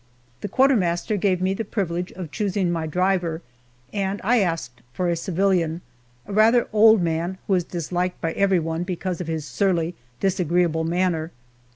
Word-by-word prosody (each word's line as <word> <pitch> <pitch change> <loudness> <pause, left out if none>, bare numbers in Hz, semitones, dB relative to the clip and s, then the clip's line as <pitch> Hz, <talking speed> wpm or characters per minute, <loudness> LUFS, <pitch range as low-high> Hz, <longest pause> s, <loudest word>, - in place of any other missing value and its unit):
The - - -4
quartermaster 215 -8 +2
gave 185 -2 +1
me 190 +1 +2
the 225 - -3
privilege 180 -4 -3
of 175 -5 -7
choosing 195 -4 0
my 165 -2 -2
driver, 180 -1 0 0.5
and 200 -1 -1
I 240 +4 +3
asked 165 - -2
for 180 +6 -1
a 170 - +1
civilian, 175 -1 0 0.4
a 205 - -7
rather 225 +3 +4
old 220 -2 +6
man 170 +3 -1
who 195 - 0
is 180 -2 +2
disliked 180 +1 -3
by 165 - -1
everyone 170 -4 +1
because 180 0 -3
of 175 - -5
his 160 -2 -3
surly, 175 -1 0 0.3
disagreeable 175 -3 +1
manner. 170 -2 0
180 Hz, 160 wpm, -23 LUFS, 165-195 Hz, 0.5 s, old